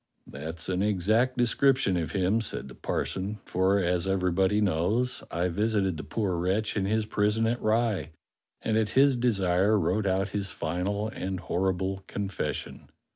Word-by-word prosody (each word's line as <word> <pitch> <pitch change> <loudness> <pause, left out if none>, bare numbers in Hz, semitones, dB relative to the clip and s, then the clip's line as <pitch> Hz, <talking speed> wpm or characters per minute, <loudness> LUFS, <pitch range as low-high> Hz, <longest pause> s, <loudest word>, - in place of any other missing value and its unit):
"That's 80 +3 -6
an 95 0 0
exact 110 +6 +2
description 125 -3 +3
of 85 -2 -2
him," 100 +4 +2
said 105 - -4
the - - -10
par - - -2
son, 100 +3 -4
"for, 95 +2 +2
as 90 -1 +1
everybody 95 +1 +2
knows, 105 +7 +1
I 85 +2 0
visited 100 0 0
the - - -6
poor 95 +3 -2
wretch 95 +5 0
in 100 -3 0
his 110 +1 +1
prison 105 +1 +1
at 120 +2 0
Rye, 110 -4 +1 0.5
and 110 -1 +1
at 110 -1 +1
his 140 0 +6
desire 100 -4 +2
wrote 100 +3 0
out 95 +1 +1
his 100 -1 -2
final 90 +5 -2
and 95 -3 -4
horrible 95 +1 -1
confession." 95 -8 -4
95 Hz, 160 wpm, -28 LUFS, 90-110 Hz, 0.5 s, his